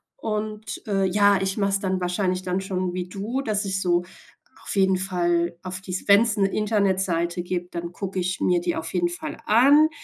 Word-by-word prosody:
Und, 215 -1 -4
äh, 195 -2 +1
ja, 200 +1 +4
ich 190 +2 -2
mach 200 -1 +1
es 195 - +1
dann 190 -1 -1
wahrscheinlich 180 +1 0
dann 185 +1 -2
schon 185 -2 -2
wie 180 0 -3
du, 220 +8 -3
dass 210 -4 -1
ich 190 -1 -1
so 175 -1 +2 0.6
auf - - -3
jeden 190 -1 +4
Fall 175 -2 0
auf 185 0 -6
die 185 - -8 0.2
wenn 200 +1 +7
es 230 -2 +1
'ne 195 - +3
Internetseite 190 -5 0
gibt, 175 0 -4
dann 170 0 -4
gucke 190 +1 -6
ich 185 +1 -2
mir 180 -1 +2
die 175 0 -1
auf 160 0 -5
jeden 175 -1 +1
Fall 175 - -6
an, 280 +8 +6
190 Hz, 205 wpm, -24 LUFS, 180-205 Hz, 0.6 s, wenn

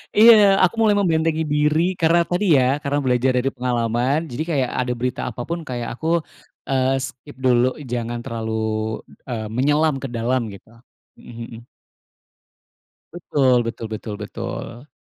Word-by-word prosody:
Iya, 230 +2 +9 0.3
aku 185 - +3
mulai 215 -2 +4
membentengi 160 -3 +1
diri, 150 +1 +2 0.2
karena 170 +1 +4
tadi 180 +4 -1
ya, 130 +3 +2
karena 145 +1 0
belajar 125 0 +2
dari 135 +2 0
pengalaman, 120 +1 0
jadi 130 +6 -3
kayak 135 -5 +1
ada 125 -1 0
berita 125 0 -2
apa - - -5
pun 170 0 -2
kayak 120 -2 -4
aku, 160 - -5 0.6
eee, 130 0 +2
skip 145 +3 -13
dulu 125 0 +4 0.2
jangan 120 0 -2
terlalu, 115 -1 -4 0.5
b - - -30 0.2
eee, 110 -2 -3
menyelam 145 +5 +2
ke 135 - -5
dalam 125 +3 0
gitu, 100 - -14 0.5
mhm 115 -1 -9
mhm. 120 - -19 1.5
Betul 135 -7 +2
betul 115 -1 -5
betul 110 -1 -6
betul. 120 +5 -7
130 Hz, 150 wpm, -21 LUFS, 120-150 Hz, 1.5 s, Iya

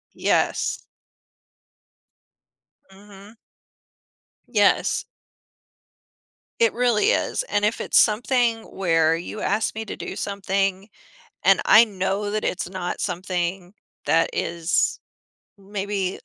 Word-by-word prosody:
Yes. - - 0 2.1
Mhm. 200 +2 -15 1.1
Yes. 205 -4 +2 1.5
It 230 -1 +3
really 240 -3 +2
is. - - 0
And 205 - 0
if 215 - -1
it's - - +3
something 230 +1 +2
where 165 -3 +1
you 180 +5 -7
ask 215 +2 0
me 220 - -4
to - - -6
do - - -6
something, 195 0 -2 0.6
and - - +5
I 225 +2 +7
know 200 0 -2
that 215 0 -2
it's 180 -1 -2
not 185 -2 -5
something 180 0 -3 0.3
that 165 0 +2
is 170 +1 0 0.6
maybe, 195 -1 -4
200 Hz, 100 wpm, -23 LUFS, 185-215 Hz, 2.1 s, I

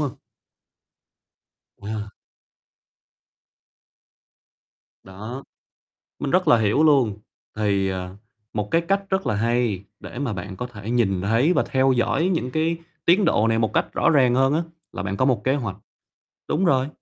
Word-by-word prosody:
hông? 145 -4 -1 1.7
À. 105 0 -5 2.9
Đó. 110 +8 -8 0.8
Mình 140 - -3
rất 180 0 +2
là 145 - +6
hiểu 110 +8 +2
luôn, 130 -9 +3 0.4
thì, 100 -2 +1
ờ, 95 0 -5 0.4
một 105 -1 -3
cái 165 - +3
cách 195 +4 0
rất 190 0 0
là - - +1
hay 115 -2 0 0.2
để - - -9
mà 135 -5 -2
bạn 95 0 -6
có 125 - -4
thể 110 -3 -8
nhìn 105 -7 +1
thấy 115 - +2
và - - +2
theo 130 0 +3
dõi 120 +9 +1
những 130 -6 -2
cái 160 +3 0 0.3
tiến 185 +4 +4
độ 115 -9 +3
này 115 0 +2
một 110 -1 0
cách - - 0
rõ - - +2
ràng 130 -6 +4
hơn 135 +2 +3
á, 160 - +1 0.3
là 90 - -4
bạn 100 0 -3
có 130 - +1
một 130 -3 +1
kế 130 - +2
hoạch, 115 -10 -3 0.7
đúng 175 +5 +1
rồi, 135 -5 +2
120 Hz, 160 wpm, -23 LUFS, 105-145 Hz, 2.9 s, là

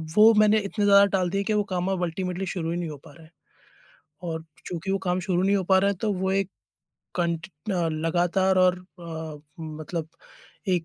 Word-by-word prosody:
वो 220 +2 +8
मैंने 215 0 +5
इतने 205 +1 -1
ज़्यादा 200 0 +7
टाल 180 -2 0
दिए 195 +2 -1
कि 215 - 0
वो 210 -1 +2
काम 185 -2 -2
अब 180 -2 -1
अल्टीमेटली 180 +2 -2
शुरू 170 -3 -3
ही 170 - -1
नहीं 170 -2 -3
हो 150 - -7
पा 145 - -12
रहे 160 - -16
हैं। 160 - -21 1.0
और 160 0 -4 0.2
चूंकि 180 +2 -4
वो 195 - +2
काम 180 0 0
शुरू 180 -1 0
नहीं 200 +1 +3
हो 190 - +1
पा 190 +1 +4
रहे 200 +1 +3
हैं 190 - -5
तो 215 -2 +1
वो 190 +1 -1
एक 195 -1 +1 0.7
कांट 170 -2 -1
अ, 175 +1 -2
लगातार 175 +4 +1
और 185 0 +4
अ, 165 -4 -8 0.2
मतलब 155 +1 -5 0.6
एक 175 -3 +1
180 Hz, 210 wpm, -26 LUFS, 165-195 Hz, 1.0 s, वो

